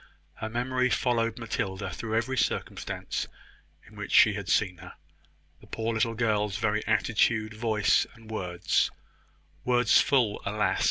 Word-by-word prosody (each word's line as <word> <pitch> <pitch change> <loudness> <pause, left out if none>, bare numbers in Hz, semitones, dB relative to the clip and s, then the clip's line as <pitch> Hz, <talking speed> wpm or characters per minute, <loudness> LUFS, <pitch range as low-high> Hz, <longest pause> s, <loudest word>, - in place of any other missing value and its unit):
Her 110 - -6
memory 125 +2 0
followed 115 -3 0
Matilda 100 -4 -3
through 110 -1 -4
every 115 +4 0
circumstance - - -2 0.6
in - - -17
which - - -6
she 110 - +6
had 100 -3 -5
seen 90 -1 +1
her. - - -11 0.7
The - - -18
poor 115 +1 -2
little 115 +1 0
girl's 105 -3 0
very 105 0 0
attitude, 110 0 +1
voice, 110 -2 +2
and 110 -1 -14
words 90 -4 0 0.7
words 125 -1 +4
full, 125 -7 +1
alas! 105 +1 0
110 Hz, 140 wpm, -28 LUFS, 105-115 Hz, 0.7 s, she